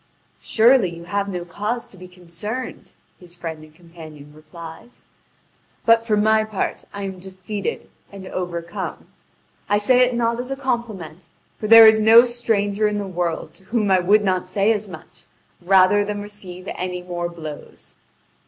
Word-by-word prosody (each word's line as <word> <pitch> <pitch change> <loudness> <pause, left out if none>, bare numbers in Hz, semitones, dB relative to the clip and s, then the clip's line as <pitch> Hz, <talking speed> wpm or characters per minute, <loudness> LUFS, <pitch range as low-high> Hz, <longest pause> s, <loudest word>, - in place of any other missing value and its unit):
"Surely, 235 -3 +4
you 170 0 -10
have 200 +3 -2
no 180 -2 -5
cause 210 +7 -4
to - - -15
be 185 0 -12
concerned." 180 +7 -7 0.3
his 175 -1 -11
friend 160 -3 -7
and 155 0 -17
companion 160 -4 -13
replies; 160 +8 -12 0.8
"but 230 0 +5
for 215 -2 0
my 220 +1 +3
part, 215 -3 -4
I 200 - -6
am 190 -1 -6
defeated 190 +2 -6 0.2
and 195 -1 -10
overcome; 175 -2 -5 0.6
I 205 - +3
say 245 +5 +3
it 250 -1 +3
not 235 0 0
as 250 +1 -4
a 270 - -2
compliment; 225 - -4 0.3
for 215 - -3
there 225 +1 +10
is 220 0 +7
no 225 +3 +7
stranger 215 -4 0
in 210 0 -2
the 205 - -3
world, 175 -3 -3
to 190 - -16
whom 210 -1 0
I 190 - +5
would 205 +4 +3
not 185 -2 0
say 200 +4 +2
as 210 -1 -4
much, 160 -4 -13 0.4
rather 190 +3 +4
than 205 0 -4
receive 190 -3 -10
any 180 -1 -5
more 175 -1 -4
blows." 155 -3 -10
195 Hz, 165 wpm, -21 LUFS, 175-220 Hz, 0.8 s, there